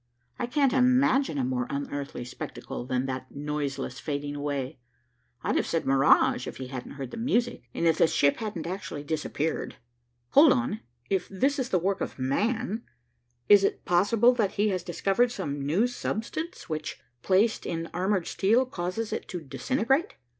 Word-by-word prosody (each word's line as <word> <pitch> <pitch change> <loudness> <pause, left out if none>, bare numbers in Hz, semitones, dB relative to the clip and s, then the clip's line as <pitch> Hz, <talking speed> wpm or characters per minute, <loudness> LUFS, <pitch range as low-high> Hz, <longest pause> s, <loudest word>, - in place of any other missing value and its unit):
"I - - -1
can't 275 +1 +2
imagine 255 - +3
a 135 - +1
more 125 -1 -1
unearthly 140 -2 -4
spectacle 120 0 -7
than 130 0 0
that 130 -1 -4
noiseless 145 -1 -3
fading 145 -1 -3
away. 140 -3 -3 0.6
I'd - - 0
have - - 0
said 165 - -1
mirage, 150 - +4
if - - -6
he 130 -1 -6
hadn't 130 -2 -6
heard 135 -3 -6
the - - -7
music, 235 - 0
and - - 0
if 165 -1 +3
the - - +6
ship 140 -2 +3
hadn't 210 -7 -4
actually 175 -5 -5
disappeared. 155 +1 -2 0.5
Hold 290 0 +7
on 250 -4 -1 0.3
if 190 -2 0
this 270 +9 +1
is 260 - -1
the 185 - +3
work 190 +3 0
of - - -4
man, 210 - 0 0.7
is 205 -1 +7
it - - 0
possible 210 +7 +4
that 215 -5 0
he 210 +1 +2
has 185 -2 -1
discovered 195 +7 +1
some 145 - -4
new 165 +11 +2
substance 245 +7 -4
which, 155 -3 -4 0.2
placed 200 - +2
in 165 -1 -2
armored 185 0 0
steel, 225 +7 +2
causes 210 0 -3
it - - -4
to 180 - -4
disintegrate? 265 - 0
185 Hz, 170 wpm, -27 LUFS, 145-235 Hz, 0.7 s, Hold